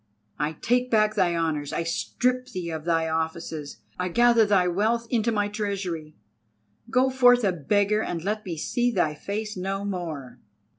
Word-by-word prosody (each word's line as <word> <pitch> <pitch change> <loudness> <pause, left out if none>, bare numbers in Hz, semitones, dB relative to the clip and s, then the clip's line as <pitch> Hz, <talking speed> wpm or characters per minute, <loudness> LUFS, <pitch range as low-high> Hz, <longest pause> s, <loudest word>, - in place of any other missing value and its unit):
I 150 +2 0
take 245 +9 0
back 215 -2 +3
thy 185 -5 +2
honours, 155 -3 -1
I - - -1
strip 250 +9 -1
thee 180 -8 -5
of 160 -1 -5
thy 165 -1 +1
offices, 160 -2 -4 0.2
I 180 - 0
gather 235 +2 +4
thy 190 -3 +3
wealth 220 +6 +1
into 235 -1 +2
my 205 -2 +1
treasury. 195 -7 -4 0.7
Go 255 +3 +3
forth 245 -2 +5
a 195 - +3
beggar, 205 +6 +1
and 170 -6 -3
let 215 +2 -2
me 170 -3 -5
see 245 +9 0
thy 155 -10 +1
face 210 +7 -4
no 195 +2 -3
more!" 155 -11 -5
195 Hz, 165 wpm, -25 LUFS, 165-220 Hz, 0.7 s, forth